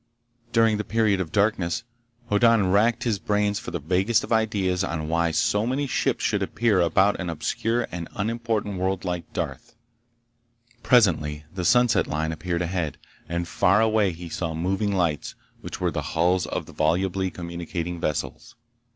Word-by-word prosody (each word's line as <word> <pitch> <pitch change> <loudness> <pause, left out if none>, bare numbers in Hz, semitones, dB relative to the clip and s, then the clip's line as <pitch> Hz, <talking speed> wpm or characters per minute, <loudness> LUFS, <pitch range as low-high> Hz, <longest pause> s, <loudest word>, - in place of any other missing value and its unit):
During 115 -2 +3
the 105 - -2
period 110 -3 +1
of 80 - -5
darkness, 100 0 +1 0.5
Hoddan 105 -2 +4
racked 110 +4 +3
his 110 -5 0
brains 105 0 0
for - - -7
the - - -3
vaguest 95 +8 +1
of - - -2
ideas 100 -5 +1
on 80 -4 -3
why 85 0 +2
so 105 +7 +1
many 135 +3 0
ships 130 - -1
should - - +1
appear 110 -6 +1
about 95 +4 +3
an 90 -2 -3
obscure 115 +9 -1
and 85 -1 -5
unimportant 110 -2 -2
world 95 0 -1
like 90 -2 -4
Darth. - - -5 1.1
Presently 80 -12 +3
the 95 -1 -4
sunset 120 +5 +3
line 80 +1 -1
appeared 85 +2 -2
ahead, 85 -4 -2 0.3
and 85 0 -2
far 95 +5 +3
away 110 -3 +3
he 85 +1 -8
saw 80 -1 -3
moving 95 +5 0
lights 85 -6 -1 0.2
which - - -7
were - - 0
the - - -2 0.2
hulls 90 +2 +2
of - - -3
the - - -13
volubly 95 +4 +1
communicating 85 0 -5
vessels. 75 - -4
95 Hz, 160 wpm, -25 LUFS, 85-110 Hz, 1.1 s, Hoddan